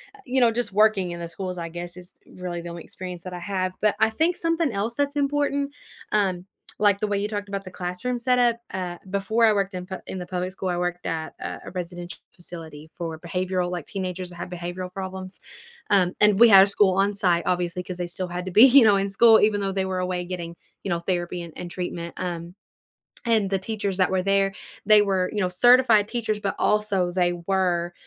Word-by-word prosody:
uh, - - -19
you 260 +1 0
know, 240 -2 +5
just 235 -2 -2
working 200 -3 +3
in 170 - -6
the 170 - -5
schools, 180 +2 -6
I 170 -1 -4
guess, 175 +1 -8
is 180 0 -13
really 175 -2 -6
the 170 - -7
only 170 -1 -8
experience 180 -2 -8
that 185 - -7
I 180 - -5
have. 185 0 -2
But 210 -1 +3
I 220 - +4
think 325 +10 +1
something 330 -3 0
else 215 +3 -2
that's 285 0 -1
important, 285 0 0 0.4
um, 190 -4 +1 0.3
like 205 -1 +3
the 215 - +1
way 205 -1 0
you 205 - -1
talked 205 -1 -5
about 195 0 -4
the - - -7
classroom 180 +8 -3
setup, 245 -1 +2 0.2
uh, 180 -2 -4
before 200 +4 +1
I 220 - +5
worked 200 -1 -1
in 180 -1 -5
p 190 0 -6
in - - -5
the 180 - -5
public 180 +1 -3
school, 190 0 -4
I 175 - -1
worked 175 0 -3
at 160 -1 -3
a - - -4
a - - -8
residential 175 -1 -6
facility 160 -3 -10
for 165 -2 -5
behavioral 180 +1 -2
like, 175 -4 -5
teenagers 185 -2 -4
that 175 - -12
have 175 - -6
behavioral 180 +1 -6
problems, 190 -1 -7 0.5
um, 185 -3 +3
and 210 -1 +5
we 235 - +9
had 195 -3 +9
a - - +2
school 200 -2 +3
on-site, 195 -3 +2
obviously, 180 0 -1
'cause 180 0 -7
they 175 -1 -3
still 180 +1 -5
had 180 +1 -4
to 185 - -5
be, 215 +6 +7
you 265 -2 +7
know, 210 -2 +6
in 195 0 0
school 225 +3 +6
even 210 -1 +3
though 195 -1 -2
they 190 0 0
were 185 -1 -2
away 180 -1 -2
getting, 175 -2 -6 0.3
you - - -4
know, 170 -1 0
therapy 175 0 -2
and 165 - -10
and 175 - -7
treatment, 175 -1 -5
um, 175 0 -5 0.7
and 220 -4 +2
the 195 - 0
teachers 200 -1 -3
that 185 -1 +2
were 185 -1 +1
there, 195 0 +2 0.3
they 215 0 +7
were, 190 -3 +1
you 210 - -1
know, 185 - +1
certified 235 +1 +5
teachers, 220 -3 -2
but 200 - -2
also 200 -4 +1
they 175 -1 +1
were, 180 -3 0
185 Hz, 230 wpm, -24 LUFS, 180-210 Hz, 0.7 s, we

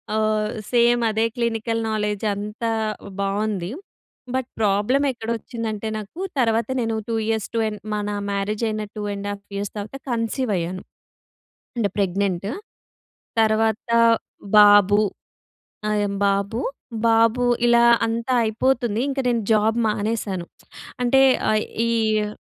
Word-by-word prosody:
ఆహ్, 215 -1 +1 0.2
సేమ్ 240 0 +4
అదే 220 +1 +1
clinical 230 -1 -1
knowledge 210 -1 -1
అంతా 210 +3 -3 0.5
బాగుంది. 200 -2 -1 0.7
బట్, 260 -1 -2
ప్రాబ్లమెక్కడ 230 +4 +1
వచ్చిందంటే, 225 -2 -5
నాకు 215 - -9 0.2
తర్వాత 225 -2 +2
నేను 225 -1 -1
2 230 - 0
ఇయర్స్, 220 -2 -1
2 225 - +2
అండ్ 210 -1 -5 0.2
మన 205 0 -2 0.2
మ్యారేజయిన 215 +2 -1 0.2
2.5 205 -1 -4
ఇయర్స్ 200 0 -3
తర్వాత 210 +6 -6
కన్సీవయ్యాను. 215 -7 -1 0.9
అంటే 205 -5 0
ప్రెగ్నెంటు. 195 0 0 0.9
తర్వాత 220 +1 +1 0.7
బాబు, 205 0 +7 0.9
అయమ్ 205 -1 0
బాబు, 200 +4 -1 0.5
బాబూ 230 +2 +3 0.2
ఇలా 235 0 +5 0.2
అంతా 230 +2 -2
అయిపోతుంది. 230 0 0
ఇంక 275 - -4
నేను 235 -2 +1
జాబ్ 220 +2 +2
మానేశాను. 210 -4 -2 0.6
అంటే, 265 +2 +4 0.3
అయ్ 215 0 +1 0.2
ఈయ్యు 220 -2 +1
215 Hz, 105 wpm, -22 LUFS, 205-230 Hz, 0.9 s, బాబు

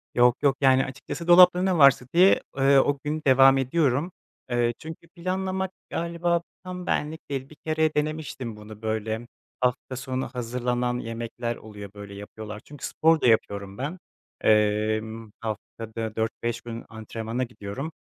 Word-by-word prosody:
Yok 120 0 +5
yok. 140 -1 +3
Yani, 130 -1 +5
açıkçası, 135 +5 -7
dolapta 180 0 +8
ne 185 -1 +2
varsa 140 -4 +6
diye, 185 +3 +6 0.2
eee, 135 0 +5
o 145 +1 +2
gün 150 +1 -2
devam 135 0 +7
ediyorum. 140 +3 +1 0.4
Eee, 120 -1 +1
çünkü 160 +1 -9
planlamak 190 +1 -2 0.2
galiba 170 0 0 0.2
tam 180 -1 -6
benlik 155 0 -2
değil. 135 -1 -4
Bir 155 - -14
kere 155 0 +1
denemiştim 150 -6 -2
bunu 105 0 -12
böyle. 110 +1 -2 0.3
Hafta 125 +1 0
sonu 130 0 -3
hazırlanan 125 0 -2
yemekler 115 +1 -4
oluyor. 105 -3 -10
Böyle 100 -1 -9
yapıyorlar. 105 +1 -8
Çünkü 145 -3 -8
spor 160 -1 +3
da - - +3
yapıyorum 100 -3 +1
ben. 150 +8 -4 0.4
Emm, 110 +1 +1
haftada 110 0 -5
4-5 115 +1 -2
gün 115 -1 -7
antrenmana 115 +2 -4
gidiyorum. 120 +5 -6
125 Hz, 145 wpm, -26 LUFS, 110-155 Hz, 0.4 s, dolapta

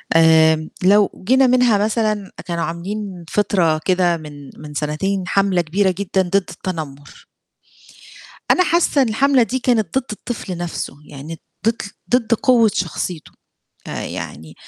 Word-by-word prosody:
آمم، 160 -1 +5
لو 200 +1 +3
جينا 260 +2 +5
منها 245 -3 +4
مثلًا 215 -1 -1
آآ - - -8
كانوا 170 -2 -2
عاملين 185 +1 -5
فِطرة 175 -6 +1
كده 180 -2 +2
من 145 -3 -11
من 150 -1 -10
سنتين 155 +7 -2
حملة 195 -3 +2
كبيرة 190 +4 +1
جدًا 195 -1 0
ضِد 185 +1 -2
التنمُر. 165 -7 -4 1.3
أنا 365 - +4
حاسّة 340 -5 +2
إن 250 - +2
الحملة 270 +2 +3
دي 260 +3 -2
كانت 240 -1 +1
ضِد 265 - +1
الطفل 210 -4 -5
نفسه 175 -4 -4
يعني 150 +3 -9 0.3
ضِد 225 +1 +1 0.3
ضِد 245 -2 +2
قوة 230 -2 +4
شخصيته. 175 -2 -4 0.6
آآ - - -5
يعني 80 +1 -7
190 Hz, 140 wpm, -19 LUFS, 165-220 Hz, 1.3 s, آمم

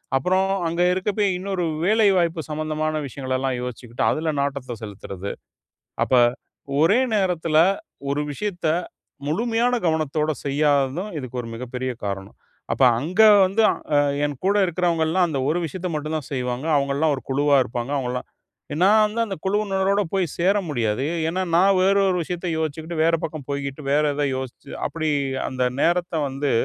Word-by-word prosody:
அப்புறம் 185 +8 +2 0.2
அங்க 170 +2 -1
இருக்கப்பயே, 200 +2 0
இன்னொரு 190 -1 -3 0.2
வேலைவாய்ப்பு 190 -6 +3
சம்மந்தமான 155 0 -2
விஷயங்கலல்லாம் 130 0 -2
யோசிச்சுக்கிட்டு, 120 -1 -5
அதுல 155 0 -1
நாட்டத்த 135 -4 -3
செலுத்துறது. 100 -2 -6 0.7
அப்ப - - -2 0.7
ஒரே 200 +10 +4
நேரத்துல, 175 -6 +1 0.5
ஒரு 145 +1 0
விஷயத்த 175 +1 -3 0.6
முழுமையான 235 +8 +1
கவனத்தோட 155 -1 0
செய்யாததும், 145 +5 +1
இதுக்கு 130 -1 -5
ஒரு 115 - -8
மிகப்பெரிய 125 +2 -4
காரணம். 95 -1 -5 0.4
அப்ப, - - 0 0.2
அங்க 180 +8 +2 0.2
வந்து 200 +4 +1 0.3
அ - - +6 0.3
என் 145 -3 -3
கூட 200 +1 +3
இருக்கிறவங்கலாம் 175 0 +1
அந்த 150 -4 -2
ஒரு 165 - +1
விஷயத்த 180 +4 -5
மட்டும் 155 +1 -2
தான் 145 - -10
செய்வாங்க. 125 +1 -2
அவங்கள்லாம் 140 +2 +1
ஒரு 130 - -8
குழுவா 145 +1 +3
இருப்பாங்க 120 +2 -4
அவங்கலாம். 125 -1 -3 0.5
எ - - -3
நான் 215 +3 +6
வந்து, 215 +2 -3
அந்த 195 -3 -4
குழுவினரோடு 200 0 +1
போய் 190 -1 +2
சேர 190 +4 +3
முடியாது. 115 -2 0 0.2
ஏன்னா, 185 +3 -1
நான் 195 +2 +5
வேற 195 +1 +4
ஒரு 185 - +1
விஷயத்த 175 +2 -5
யோசிச்சுக்கிட்டு 160 +2 -3
வேற 165 +1 +3
பக்கம் 155 -4 -5
போய்க்கிட்டு 140 0 -4
வேற 150 +1 +4
எதாவது 145 -1 0
யோசிச்சு 130 +1 -7 0.2
அப்டி 160 -1 -2 0.4
அந்த 130 -1 -3 0.2
நேரத்த 175 0 +1
வந்து, 135 +1 -2
155 Hz, 145 wpm, -23 LUFS, 135-185 Hz, 0.7 s, அ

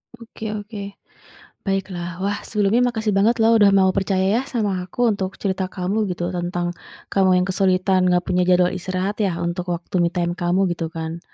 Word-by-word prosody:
Oke 220 -2 -7
oke 205 -1 -7 0.7
baiklah 185 -3 -3
wah 205 +1 -1
sebelumnya 210 +3 +2
makasih 220 -2 -1
banget 215 +4 +3
lo 225 +1 +5
udah 205 -3 +6
mau 190 -1 +4
percaya 195 +3 +1
ya - - -3
sama 205 -6 -1
aku 240 +7 -1
untuk 190 -1 -4
cerita 190 -2 -2
kamu 200 +3 -1
gitu 175 0 -3
tentang 175 0 -2 0.4
kamu 185 -2 +4
yang 180 - +1
kesulitan 185 -1 +2
nggak 180 0 +2
punya 180 0 +1
jadwal 180 0 +4
istirahat 185 +3 -3
ya 190 -4 0
untuk 175 +1 -3
waktu 175 +1 -2
me 170 - +2
time 175 -1 -1
kamu 180 +2 +1
gitu 165 -1 -4
kan. 165 0 -5
190 Hz, 180 wpm, -21 LUFS, 180-205 Hz, 0.7 s, udah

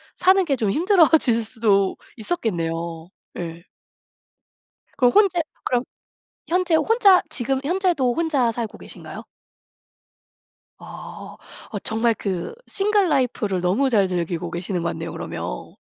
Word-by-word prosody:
사는 375 0 +4
게 280 -4 +1
좀 220 -5 -1
힘들어지실 320 - +4
수도 210 -4 +1 0.2
있었겠네요. 170 - -3 0.3
예. 170 -1 -6 1.3
그럼 245 -2 +4
혼자 390 -4 +4 0.2
그럼 245 0 0 0.6
현재 360 -1 +1
혼자 405 0 +5
지금 270 -2 -1
현재도 340 -7 +1
혼자 290 -7 +1
살고 225 -2 -5
계신가요? - - -9 1.6
어. - - -10 0.4
어 205 - -2
정말 225 +1 +1
그 195 - -4
싱글 405 -2 +1
라이프를 235 - 0
너무 200 +10 +1
잘 205 -6 +3
즐기고 175 -1 -3
계시는 175 0 -3
것 170 - -1
같네요. - - -5
그러면 - - -6
240 Hz, 255 characters per minute, -22 LUFS, -, 1.6 s, 혼자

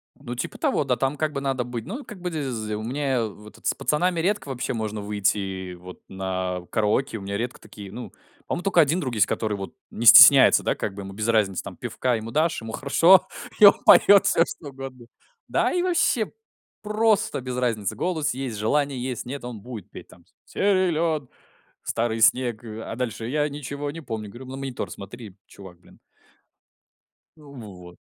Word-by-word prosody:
Ну, 125 -3 -8
типа 120 - -5
того, - - +1
да, - - 0
там 135 +2 -1
как 155 -1 -1
бы 140 - -3
надо 135 -2 -1
быть 120 -2 -6
Ну, 255 +9 -6
как 210 - -11
бы 180 -1 -3
з 120 -8 -3
у 105 - -5
меня 130 0 -1
вот 105 0 -11
это - - -6
с - - +2
пацанами 175 +3 0
редко 195 +1 -1
вообще 130 -1 -3
можно 110 -2 -4
выйти 100 -2 -2
вот 90 +1 -12
на 95 -1 -3
караоке. 110 +4 0
У - - -9
меня 100 +1 -4
редко 120 +2 -4
такие, 100 -2 -11
ну, 120 +3 -8 0.4
по-моему, 175 - -3
только 190 -4 +4
1 155 +4 +2
друг 130 -8 -3
есть, 105 - +3
который, 105 -2 -2
вот, 95 -1 -7 0.2
не - - -5
стесняется, - - +9
да, - - +1
как 105 - -4
бы, 100 - -7
ему 95 - -8
без 105 +2 -3
разницы. 105 -5 +1
Там, - - -9
пивка 125 -2 -1
ему 110 +1 -6
дашь, 160 0 0
ему 115 0 -7
хорошо, 165 +9 +4 0.3
и 210 - +9
он 200 - +10
поет 200 -1 +7
всё, 165 - +4
что 145 - -9
угодно. 135 -2 -9 0.4
Да - - +1
и 355 - +1
вообще 335 -11 +1 0.5
просто 215 -5 +1
без 125 0 -5
разницы: 115 -6 -1
голос 160 -5 -1
есть, 130 -4 -5
желание 135 +4 0
есть, 125 -2 -4
нет, 135 +2 -6
он 120 -4 -7
будет 110 -4 -9
петь - - -11
там: 85 - -19 0.2
"Силен, 170 -7 0 0.6
старый 115 -1 -1
снег, 120 0 +3
а 115 0 -7
дальше 115 -2 -4
я 150 +3 0
ничего 145 0 -5
не 165 - -8
помню". 110 -6 -5
Говорю: 120 +6 -11
"На 130 +1 -7
монитор 135 -2 -5
смотри, 105 -1 -10
чувак, 95 -3 -14
блин". - - -20 1.4
Вот. 105 - -12
125 Hz, 190 wpm, -24 LUFS, 105-150 Hz, 1.4 s, он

